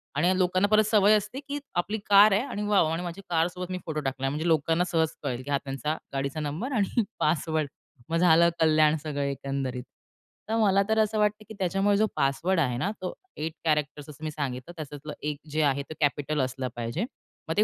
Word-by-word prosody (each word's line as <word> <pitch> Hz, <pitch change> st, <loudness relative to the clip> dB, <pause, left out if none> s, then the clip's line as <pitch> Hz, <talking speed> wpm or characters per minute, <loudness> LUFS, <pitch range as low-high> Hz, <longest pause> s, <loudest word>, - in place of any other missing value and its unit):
आणि 185 Hz, +1 st, +2 dB
लोकांना 185 Hz, +2 st, +2 dB
परत 215 Hz, +1 st, +5 dB
सवय 210 Hz, -1 st, +5 dB
असते, 210 Hz, +6 st, -2 dB
की 290 Hz, 0 st, -5 dB, 0.2 s
आपली 210 Hz, +5 st, -4 dB
कार 205 Hz, +1 st, +8 dB
आहे 205 Hz, -, +3 dB
आणि 210 Hz, -6 st, -4 dB
वॉव, 195 Hz, -6 st, +4 dB
आणि 170 Hz, +2 st, -2 dB
माझी 175 Hz, +3 st, -6 dB
कारसोबत 180 Hz, +2 st, -1 dB
मी 185 Hz, -, -2 dB
फोटो 155 Hz, -1 st, -2 dB
टाकलाय, 135 Hz, 0 st, -2 dB
म्हणजे 150 Hz, +4 st, -2 dB
लोकांना 165 Hz, +1 st, +2 dB
सहज 160 Hz, -2 st, +2 dB
कळेल 125 Hz, 0 st, -2 dB
की 145 Hz, -, -6 dB
हा 140 Hz, -, +3 dB
त्यांचा 140 Hz, +3 st, -2 dB, 0.2 s
गाडीचा 140 Hz, +2 st, -2 dB
नंबर 155 Hz, -, -3 dB
आणि 215 Hz, +2 st, +1 dB, 0.2 s
पासवर्ड. 155 Hz, -1 st, 0 dB, 0.4 s
मग 165 Hz, -, +1 dB
झालं 170 Hz, -1 st, +5 dB
कल्याण, 155 Hz, -1 st, +4 dB
सगळं 145 Hz, -2 st, -3 dB
एकंदरीत. 135 Hz, -2 st, -3 dB, 0.7 s
तर 225 Hz, -, +1 dB
मला 200 Hz, -3 st, +4 dB
तर 220 Hz, 0 st, +3 dB
असं 215 Hz, 0 st, +2 dB
वाटतं 210 Hz, 0 st, +1 dB
की -, -, -7 dB
त्याच्यामुळे 195 Hz, +2 st, +2 dB
जो 215 Hz, -, +4 dB
पासवर्ड 165 Hz, +7 st, +1 dB
आहे 125 Hz, -6 st, +1 dB
ना, 190 Hz, -, 0 dB
तो 180 Hz, -, -3 dB, 0.2 s
एट 160 Hz, +1 st, -3 dB
कॅरेक्टर, 150 Hz, -2 st, 0 dB
असं 150 Hz, +1 st, -12 dB
मी 155 Hz, -, -2 dB
सांगितलं, 140 Hz, +1 st, -4 dB
त्यातलं 145 Hz, +1 st, -7 dB
एक 150 Hz, -1 st, -2 dB
जे 155 Hz, -, +1 dB
आहे 140 Hz, -1 st, +1 dB
ते -, -, -5 dB
कॅपिटल 145 Hz, 0 st, +1 dB
असलं 130 Hz, 0 st, -2 dB
पाहिजे. 120 Hz, -, -2 dB, 0.4 s
मग -, -, +1 dB
ते 210 Hz, -, +6 dB
160 Hz, 205 wpm, -27 LUFS, 145-195 Hz, 0.7 s, कार